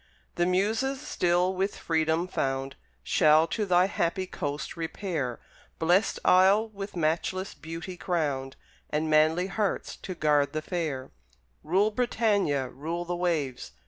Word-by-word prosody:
The 175 - +1
Muses, 220 +9 +1
still 180 -9 +1
with 195 +2 -1
Freedom 160 +1 0
found, 135 -4 -2 0.3
Shall 155 -1 +5
to 210 -3 -1
thy 180 0 +5
happy 185 0 -1
coast 145 -4 -4
repair; 165 - -3 0.4
Blest 175 +6 +2
Isle, 195 +4 +5
with 200 -2 -7
matchless 175 +4 -1
beauty 165 +3 -7
crowned, 140 -8 -2 0.3
And 155 +1 -1
manly 155 +3 +4
hearts 195 +1 -2
to 185 - -7
guard 150 -3 +2
the 155 0 -2
fair: 155 -8 -3 0.5
Rule, 190 +7 +2
Britannia, 205 - +1
rule 165 +7 -4
the 175 +1 -2
waves! 160 -8 -2
175 Hz, 130 wpm, -28 LUFS, 155-190 Hz, 0.5 s, Shall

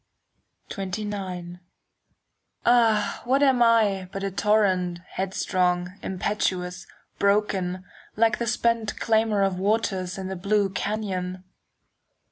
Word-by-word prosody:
XXIX 190 -3 -5 1.1
Ah, 225 -4 +3
what 270 +4 +2
am 265 -3 +4
I 210 -5 +3
but 195 - -5
a 195 - -1
torrent, 190 -3 +2
Headstrong, 180 -1 -1
impetuous, 185 -1 -2 0.3
broken, 195 -3 +1 0.3
Like 225 0 +2
the 235 - -2
spent 230 -1 0
clamour 220 -2 +2
of 190 -2 0
waters 190 -3 0
In 190 -1 -4
the 190 - -4
blue 200 +1 +1
canyon? 185 -2 -3
195 Hz, 100 wpm, -25 LUFS, 185-215 Hz, 1.1 s, am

